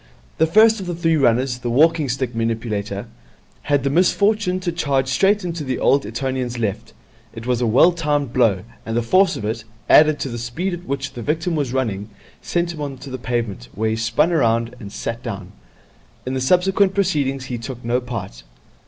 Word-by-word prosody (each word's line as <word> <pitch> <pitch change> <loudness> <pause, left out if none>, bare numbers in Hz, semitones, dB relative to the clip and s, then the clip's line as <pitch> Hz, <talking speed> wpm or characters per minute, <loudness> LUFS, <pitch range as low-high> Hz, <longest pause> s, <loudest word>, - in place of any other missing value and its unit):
The 160 - +4
first 220 +5 +5
of 190 - -6
the 175 - -3
three 165 -1 +1
runners, 125 -2 +2
the 120 - -3
walking 155 +3 +3
stick 125 -1 -2
manipulator, 110 -3 -2 0.6
had 145 -2 +2
the 140 - 0
misfortune 185 +3 +2
to 180 -1 -1
charge 140 -5 0
straight 195 +7 +2
into 170 -3 -3
the 130 -2 -2
old 140 +1 +2
Etonian's 125 +1 -3
left. 110 -4 -3 0.4
It 115 - -8
was 125 -1 0
a 120 - +2
well 130 +10 +5
timed 145 -6 -1
blow, 110 -8 +2 0.2
and 115 +1 -3
the 120 - +1
force 185 +11 +3
of 105 - -5
it, 110 +1 -3 0.2
added 155 -1 +6
to 135 - -2
the 120 -1 -5
speed 140 +11 -3
at 175 +1 -7
which 135 0 -3
the 120 - -7
victim 160 +7 -1
was 145 -5 -1
running, 110 -6 -2 0.3
sent 170 0 -1
him 155 - -8
on 140 -2 -4
to 135 +1 -10
the 130 - -5
pavement, 115 - -3
where 110 +1 0
he - - 0
spun 115 +9 +1
round 115 -6 +1
and 100 -2 -9
sat 115 +3 -4
down. - - -6 0.7
In 130 - -3
the 130 - -1
subsequent 185 +6 +3
proceedings 145 -9 0
he 125 -2 -4
took 120 0 -7
no 120 +2 +1
part. 115 - -6
130 Hz, 200 wpm, -21 LUFS, 115-165 Hz, 0.7 s, added